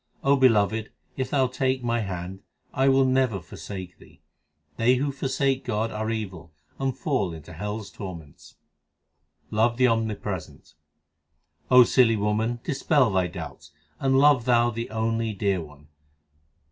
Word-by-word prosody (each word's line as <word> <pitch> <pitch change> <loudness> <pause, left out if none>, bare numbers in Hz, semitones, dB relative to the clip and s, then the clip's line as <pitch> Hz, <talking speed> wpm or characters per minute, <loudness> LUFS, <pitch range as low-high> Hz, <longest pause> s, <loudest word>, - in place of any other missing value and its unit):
O 140 +1 +4
Beloved, 110 -4 +2 0.2
if 130 -1 -3
Thou 135 -2 +2
take 130 0 -1
my 120 0 0
hand, 95 -2 -5 0.3
I 135 +1 +3
will 135 0 +4
never 130 -5 +1
forsake 90 +2 -9
Thee. - - -19 0.6
They 120 +3 +4
who 140 +3 -1
forsake 135 0 -1
God 110 +2 -1
are 110 +1 -3
evil 95 -7 -5 0.3
and 135 -1 -1
fall 120 - -1
into 80 +2 -11
hell 105 +6 -4
s 100 - -10
tor 95 -4 -7
ments. 75 -4 -15 1.0
Love 115 +2 +2
the 130 0 +4
Omnipresent: 115 -3 -3 1.0
O 125 0 +8
silly 120 -1 +4
woman, 110 +3 -1
dispel 140 -4 +2
thy 95 -2 +1
doubts, 75 -5 -9 0.3
and 135 -1 +2
love 140 -4 +5
thou 120 -1 +3
the 115 +1 -5
only 115 0 -1
dear 100 -2 0
One. 75 -2 -14
115 Hz, 145 wpm, -25 LUFS, 95-130 Hz, 1.0 s, O